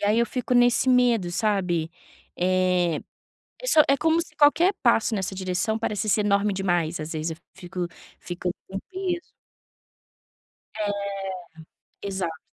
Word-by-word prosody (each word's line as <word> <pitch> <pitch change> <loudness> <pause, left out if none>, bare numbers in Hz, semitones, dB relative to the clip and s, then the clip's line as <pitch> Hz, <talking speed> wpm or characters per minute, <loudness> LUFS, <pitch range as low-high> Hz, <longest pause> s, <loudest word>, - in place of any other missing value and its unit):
E - - -1
aí 215 +2 +3
eu 235 - +3
fico 250 0 -3
nesse 245 +1 +4
medo, 240 -7 +3
sabe? 180 -5 0 0.5
Eh, 180 -2 +2 0.6
é - - -6
só 320 -11 +6
é 275 - +5
como 325 +3 +2
se 330 -2 -8
qualquer 320 +6 +5
passo 235 -2 +3
nessa 190 -1 -2
direção 190 +4 -1
parecesse 215 -1 0
enorme 205 0 +2
demais. 175 -3 0
Às 155 +1 -5
vezes, 160 0 -2
eu - - -8 0.2
fico 180 -1 -5 0.3
fico 175 0 -4 0.2
com 190 - -6
um - - -3
peso. 370 -2 -2 1.6
É, 210 -1 0 1.1
exato. 190 -5 -3
200 Hz, 145 wpm, -25 LUFS, 180-245 Hz, 1.6 s, só